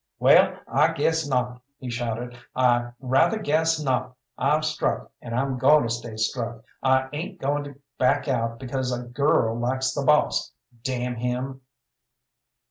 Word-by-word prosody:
"Well, - - +5
I 150 +7 +3
guess 160 0 +1
not!" 125 -2 -1 0.2
he 125 -2 -6
shouted. 120 +1 -3 0.2
"I 120 -1 +3
rather 135 - +2
guess 160 -3 +1
not! 130 -3 -1 0.2
I've 150 +4 +1
struck, 155 0 -1
and 115 -1 -5
I'm 130 0 -1
going 150 +4 +6
to 115 - -2
stay 120 -1 -6
struck! 115 0 -2 0.2
I 130 0 +3
ain't 175 +5 -5
goin' 145 +1 -1
to 140 -1 -9 0.2
back 135 +2 +2
out 115 -3 -1
because 130 0 -3
a 125 0 -3
girl 120 -2 +1
likes 130 +2 0
the 140 - -2
boss, 150 +2 +2 0.3
damn 125 -2 -2
him!" 125 +3 -3
130 Hz, 150 wpm, -25 LUFS, 120-145 Hz, 0.3 s, going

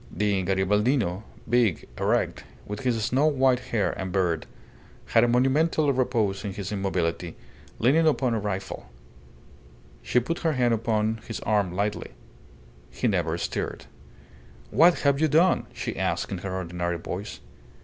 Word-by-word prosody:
The 100 -2 0
Garibaldino 100 +2 +1 0.3
big, 115 -7 +2
erect, - - 0 0.2
with 105 0 -5
his 120 -4 0
snow 130 +6 +2
white 135 -4 +3
hair 115 -5 -1
and 95 -1 -5
beard 90 -4 0 0.6
had 115 - +3
a - - +4
monumental 140 +5 +2
repose 115 -7 0
in 100 -2 -4
his 100 0 -5
immobility, 90 -4 -2 0.4
leaning 155 +7 +3
upon 130 -5 +2
a 115 - 0
rifle. 95 -10 -5 1.1
She 125 - +2
put 165 +8 -3
her 160 -2 +1
hand 125 -3 +2
upon 110 0 0
his 115 - -4
arm 105 -4 +1
lightly. 100 +3 -2 0.8
He 125 - -2
never 85 -6 0
stirred. - - -4 0.9
"What 170 +2 +5
have 140 0 +2
you 160 - +4
done?" 165 +5 +3
she - - -5
asked, - - -1
in 95 - -3
her 95 0 -4
ordinary 85 -1 -3
voice. 90 +2 -6
105 Hz, 145 wpm, -26 LUFS, 95-130 Hz, 1.1 s, What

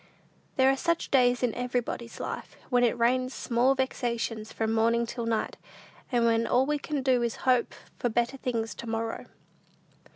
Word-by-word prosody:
There 265 0 +5
are - - +1
such 335 +3 -1
days 250 -2 +4
in 240 -3 +2
everybody's 245 -1 -3
life, - - -6
when 245 -1 +4
it 240 0 +2
rains 255 +2 +1
small 250 +3 +2
vexations 235 -4 -2
from 220 0 -1
morning 230 +1 +2
till 235 0 -4
night, 225 -1 -1 0.5
and 240 -2 +3
when 230 0 +2
all 255 +2 +3
we 295 +1 0
can 290 -2 -3
do 255 -2 +3
is 235 -1 -1
to - - -13
hope 250 -2 +2 0.2
for 245 - +1
better 240 +4 0
things 230 -4 -2
to 235 - -9
morrow. 225 0 -3
240 Hz, 175 wpm, -28 LUFS, 230-255 Hz, 0.5 s, There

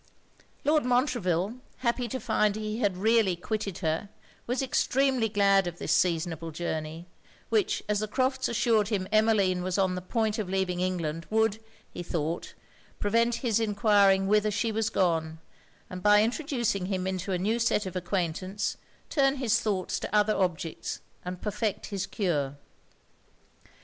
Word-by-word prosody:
Lord 305 0 +3
Montreville, 240 - 0 0.2
happy 240 0 0
to 260 +3 -4
find 215 -3 +1
he 215 +1 -3
had 200 -6 +1
really 220 -2 +3
quitted 200 +1 -3
her, 160 +5 -1 0.4
was 250 +2 0
extremely 265 -2 +1
glad 200 -2 +3
of 175 -1 -5
this - - -1
seasonable 165 -2 0
journey; 160 0 -4 0.4
which, 425 -4 +1
as 210 -1 +1
the 215 - -2
Crofts' 260 +3 0
assured 225 -3 +2
him 200 -4 -1
Emmeline 215 -4 +3
was 185 +1 -2
on 190 -2 +2
the 180 - -4
point 220 +3 -1
of 200 -4 -3
leaving 190 -2 -1
England, 170 -3 -2
would, 220 -1 +2 0.3
he - - -6
thought, 165 -1 -3 0.4
prevent 230 +3 +2
his 230 -2 +2
enquiring 205 -3 +3
whither 210 +1 +3
she 210 +2 0
was 220 0 0
gone, 165 -6 0 0.5
and 185 0 -7
by 210 +2 +6
introducing 235 - -1
him 185 -2 -2
into 190 0 -3
a 185 - +1
new 215 +6 0
set 230 -3 +1
of 185 - -6
acquaintance, 185 +2 -2 0.3
turn 275 -2 +2
his 235 -4 +2
thoughts 195 -4 -1
to - - -4
other 210 0 +4
objects 175 -3 -2 0.2
and 180 0 -6
perfect 210 0 -2
his 200 -1 -2
cure. 145 -9 -1
205 Hz, 155 wpm, -28 LUFS, 180-225 Hz, 0.5 s, by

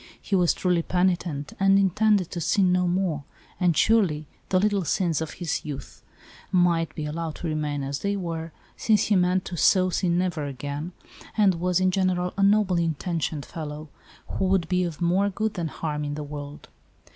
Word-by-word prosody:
He 200 - -2
was' 180 -2 +3
truly 180 -2 +1
penitent 175 -5 -1
and 195 0 +5
intended 200 -1 +2
to 170 - -4
sin 185 +2 +3
no 180 0 +2
more; 175 -5 0 0.4
and, 175 -4 +2
surely, 185 -10 +3 0.2
the 185 - +3
little 205 -1 +1
sins 165 0 0
of 160 -2 -4
his 175 -3 -3
youth 140 -3 -8 0.5
might 175 -2 +2
be 155 - -4
allowed 160 +1 -4
to 175 - -5
remain 150 -2 -2
as 140 +1 -3
they 200 0 -1
were, 165 -3 -4 0.2
since 215 -3 +2
he 210 - +2
meant 180 0 +2
to 175 - -5
so 185 +2 +4
sin 175 -1 +1
never 175 -5 -1
again, 145 +5 -5 0.4
and 205 -3 +5
was, 180 0 +2
in 185 0 +2
general, 180 -1 0
a 200 - -1
noble 200 -2 +4
intentioned 165 -2 -2
fellow, 155 -1 -7 0.4
who 190 - -2
would 185 -3 +2
be 180 0 +1
of 170 -2 -6
more 190 +4 +2
good 215 +2 -2
than 170 -2 -2
harm 150 -1 -4
in 145 0 -3
the 150 - -4
world. 145 0 -8
175 Hz, 185 wpm, -25 LUFS, 155-185 Hz, 0.5 s, and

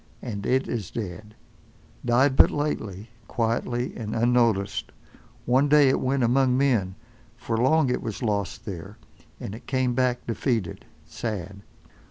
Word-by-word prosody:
And 105 -5 -4
it 130 +1 +2
is 110 -7 -3
dead—died 115 +5 -3
but - - +7
lately, 110 -8 -3 0.2
quietly, 120 +1 -1
and 110 -2 -5
unnoticed. 115 -4 +1 0.5
One 130 +4 +3
day 145 -2 +6
it 130 - +2
went 130 0 0
among 125 +1 +3
men, 115 -9 +1 0.4
for 115 -1 -3
long 130 +4 +3
it - - -1
was 110 +3 -5
lost 100 -4 -2
there, 95 +1 -7 0.4
and 100 - -6
it 110 - -11
came 130 -2 +1
back 125 0 0
defeated, 115 -5 -2 0.2
sad. 100 +3 -5
120 Hz, 135 wpm, -25 LUFS, 105-130 Hz, 0.5 s, but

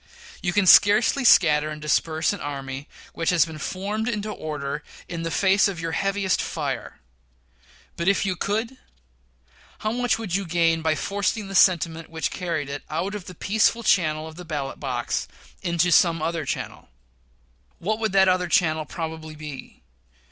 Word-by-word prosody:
You 180 - 0
can 205 +1 +2
scarcely 210 +8 +6
scatter 155 -9 +5
and 150 0 -6
disperse 160 +3 +1
an 205 - -6
army 135 0 -5 0.3
which 165 - -1
has 175 -3 +4
been 160 -2 -9
formed 205 +8 -3
into 210 -2 -3
order 150 -4 -4 0.3
in 170 -1 -5
the 165 - -2
face 195 +4 +3
of 190 -4 -5
your 165 0 -3
heaviest 195 +1 0
fire; - - -4 1.0
but 170 - -2
if 200 0 +3
you 190 -2 0
could, 220 +7 -2 1.0
how 215 - -1
much 240 -1 +1
would 210 -6 -3
you 195 0 -1
gain 165 -1 +2
by 160 -1 +1
forcing 200 +4 -2
the - - -6
sentiment 165 -3 +3
which 160 -1 -3
created 165 -6 -3
it - - -20
out 170 +6 -2
of 205 -4 -6
the 185 - -10
peaceful 220 +5 +1
channel 155 -7 +2
of 160 0 -11
the 180 - -8
ballot 145 -5 -4
box, 125 -4 -2 0.3
into 175 -1 +1
some 165 -1 +4
other 160 0 -2
channel? - - -5 0.9
What 215 +5 -2
would 220 -2 0
that 190 -1 +5
other 185 -1 +2
channel 155 -2 +2
probably 160 -1 -6
be? 150 -3 -10
170 Hz, 170 wpm, -24 LUFS, 155-200 Hz, 1.0 s, scarcely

